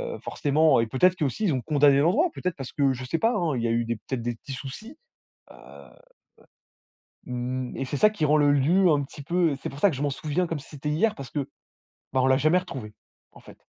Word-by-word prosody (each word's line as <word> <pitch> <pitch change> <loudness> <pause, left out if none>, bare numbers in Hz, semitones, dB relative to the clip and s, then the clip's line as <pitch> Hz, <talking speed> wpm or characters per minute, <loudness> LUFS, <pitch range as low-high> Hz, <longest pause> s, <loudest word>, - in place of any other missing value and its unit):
heu, - - -10
forcément 150 0 +2
heu. - - +3
Et 115 - -3
peut-être 180 +10 +3
qu'eux 170 -5 -1
aussi 140 - -3
qu'ils 175 - +2
ont 130 - -1
condamné 145 -2 +4
l'endroit? 225 - +3
Peut-être 180 -1 -3
parce 135 -3 -7
que 140 -3 +2
je 130 0 -7
sais 165 +6 -2
pas 225 +2 +2
hein, 165 -8 0
il 115 - -2
y - - +1
a - - 0
eu 115 0 0
des, 115 - -2
peut-être, 125 +3 -5
des 120 0 -3
petits 135 - -9
soucis. 215 - -8 0.5
Heu, - - -14
heu. - - -14 1.5
Mmh 125 0 -4
et 135 - -2
c'est 145 - -4
ça 215 - +5
qui 180 -8 -4
rend 150 +1 +4
le 145 -1 +4
lieu, 170 +7 +3
un 145 -2 +2
petit 140 +1 -10
peu 170 0 +1
heu - - -2
c'est - - -4
pour 135 - -10
ça 200 - +5
que 160 - -4
je 130 - -5
m'en 145 - +1
souviens 155 +6 -2
comme 165 -2 -3
si 140 - -13
c'était 150 0 -5
hier, 215 +8 +1
parce 135 - -9
que 145 -3 -3 0.6
bah, 130 - +2
on 130 - +2
l'a 130 0 +4
jamais 155 +5 +3
retrouvé, 130 - -8 0.4
en - - -15
fait. - - -16
145 Hz, 265 wpm, -25 LUFS, 130-165 Hz, 1.5 s, ça